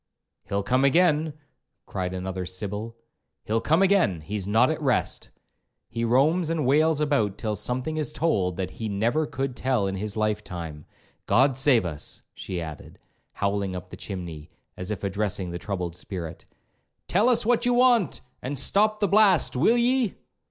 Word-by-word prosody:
'—'He'll 100 0 0
come 130 +5 +2
again,' 155 +1 +3 0.5
cried 90 -2 -3
another 95 0 -4
Sybil, 105 +5 -4 0.5
'he'll 110 +1 0
come 160 +5 +3
again,—he's 105 - +1
not 115 +7 +4
at 155 - -4
rest! 130 -5 0 0.6
He 115 - -3
roams 150 +8 +3
and 165 -4 0
wails 155 +3 +3
about 125 -10 +1
till 110 0 -2
something 130 +9 -2
is 155 - -1
told 95 - 0
that 95 -1 -3
he 110 -1 -5
never 115 +10 0
could 135 -3 -3
tell 125 -6 0
in 95 - -2
his 100 +2 -4
life 105 -1 0
time.—G 85 - -2
d - - -5
save 130 -5 +3
us!' 75 -3 -5
she 90 -2 -5
added, 80 -3 -8 0.4
howling 100 -2 -1
up 90 0 -8
the - - -7
chimney, 85 -5 -7 0.3
as 90 +2 -6
if 105 -3 -4
addressing 100 -2 -2
the 85 - -5
troubled 90 -5 -4
spirit; 90 -3 -7 0.6
'tell 210 +7 +3
us 240 -4 +3
what 240 +1 +2
you 245 - +3
want, 240 - +3 0.2
and 140 +3 -4
stop 210 +10 +2
the 205 - +3
blast, 195 -7 +4
will 195 - +4
ye?' 245 -2 +2
115 Hz, 165 wpm, -25 LUFS, 95-155 Hz, 0.6 s, not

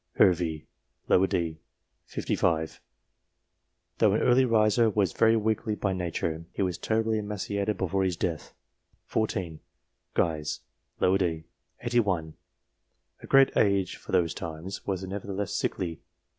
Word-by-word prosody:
Hervey, 80 -4 +3 0.4
d. 85 -4 +2 0.5
set. - - -18
55, 80 -1 0 1.2
though - - +5
an - - +1
early 130 +1 +5
riser, 115 0 +4
was 100 -5 +1
very 115 0 +4
weakly 110 0 0
by 100 -2 -1
nature; 85 -2 -2
he - - -1
was 90 -2 -2
terribly 110 0 +1
emaciated 105 0 -2
before 95 +1 0
his 90 -3 0
death. 80 -4 -3 0.5
14. 95 -7 -2 0.6
Guise, 75 -2 0 0.4
d - - +2
set. 80 -4 -1 0.4
81, 100 -10 0 0.9
a - - -10
great 135 0 +5
age 100 -2 +2
for - - -11
those 85 -2 +2
times, 85 +4 -7
was 95 -2 -1
nevertheless 100 0 -4
sickly. 85 -3 -2
95 Hz, 125 wpm, -28 LUFS, 85-105 Hz, 1.2 s, though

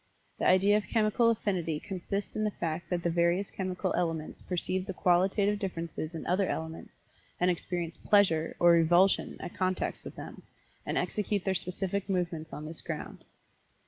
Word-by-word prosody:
The - - +2
idea 195 +3 +5
of 210 - -3
Chemical 225 +1 +3
Affinity 180 -8 0
consists 195 +3 -4
in 215 - 0
the 210 - +2
fact 170 -4 -4
that 175 -2 -1
the 170 - +2
various 170 +3 +1
chemical 185 0 -2
elements 165 -3 -2
perceive 185 +1 -1
the 190 - -4
qualitative 195 +4 +2
differences 170 -4 -4
in 160 - -5
other 185 +2 +2
elements 160 0 -6 0.4
and 180 +1 +4
experience 170 -1 -3
'pleasure' 175 -6 +3
or 175 0 +6
'revulsion' 175 +3 +4
at - - -7
contacts 185 0 -1
with - - -8
them, - - -9 0.5
and - - -1
execute 205 -2 -1
their 190 - +2
specific 190 +2 -2
movements 170 -4 -2
on 150 - -6
this 160 +1 -6
ground." - - -6
180 Hz, 165 wpm, -30 LUFS, 170-195 Hz, 0.5 s, or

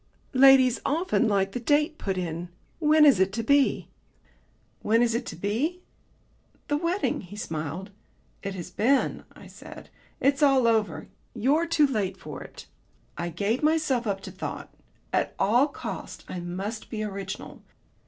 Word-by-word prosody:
"Ladies 265 -1 +6
often 325 -4 +1
like 195 -2 +1
the 245 - -4
date 300 +5 +1
put 190 -2 -2
in. 170 -1 -4 0.3
When 305 -1 +5
is 275 -10 +6
it 190 0 +3
to 230 +1 -2
be?" 280 +3 +2 0.9
"When 225 +3 +3
is 235 -1 +1
what 235 +1 -2
to - - -6
be?" 255 - -2 0.9
"The 290 - +2
wedding," 345 +5 -1
he 190 +2 -11
smiled. 165 +1 -5 0.5
"It 195 -1 -5
has 180 -1 -7
been," 260 +8 +1
I - - -13
said. - - -12 0.3
"It's 275 +2 +2
all 270 -4 +5
over. 220 -2 +1 0.3
You're 280 +9 +2
too 325 -3 +4
late 205 -8 -1
for 150 -5 -8
it." - - -11 0.5
I 170 0 -3
gave 205 +8 -1
myself 305 -6 +1
up 195 -1 -2
to - - -8
thought. - - -7 0.4
At - - 0
all 240 +8 +3
costs 285 - -7
I 180 - -5
must 190 +6 -5
be 215 -1 -3
original. 195 -2 -6
230 Hz, 155 wpm, -26 LUFS, 195-285 Hz, 0.9 s, Ladies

